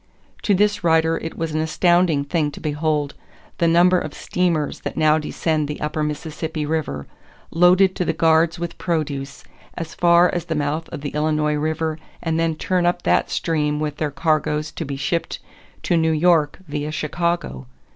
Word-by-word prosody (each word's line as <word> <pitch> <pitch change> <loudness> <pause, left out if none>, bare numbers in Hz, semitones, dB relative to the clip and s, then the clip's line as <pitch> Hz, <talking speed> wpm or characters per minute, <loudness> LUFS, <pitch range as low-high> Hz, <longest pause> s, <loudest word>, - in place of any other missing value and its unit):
To 205 - +2
this 205 0 +1
writer 160 -1 +3
it 165 - -7
was 165 -1 -3
an 155 - 0
astounding 170 -1 +2
thing 150 +1 0
to - - -9
behold 150 -1 -1 0.5
"the 170 - +3
number 175 +2 +5
of 155 - -6
steamers 170 -5 -1
that - - -6
now 155 0 +4
descend 155 0 -1
the 150 - -5
upper 150 +1 -2
Mississippi 150 +1 -3
River, 145 - -2 0.5
loaded 180 +3 +4
to 180 - 0
the - - +1
guards 165 +1 +3
with 170 0 -6
produce, 145 -5 -3 0.3
as 165 -2 -6
far 175 0 +5
as 175 -2 -2
the 160 - -2
mouth 150 +2 -2
of 155 - -7
the 145 - -3
Illinois 150 0 0
River 155 +1 -1 0.2
and 165 -1 -1
then 165 -1 +1
turn 180 +2 0
up 175 0 0
that - - +2
stream 150 -3 0
with 150 -1 -3
their 155 - -1
cargoes 155 -1 0
to 165 - -5
be 140 0 -4
shipped 165 +5 -2 0.5
to 175 - +1
New 160 -1 +2
York 155 -2 +3
via 150 +1 -3
Chicago. 155 - -2
160 Hz, 175 wpm, -21 LUFS, 150-170 Hz, 0.5 s, number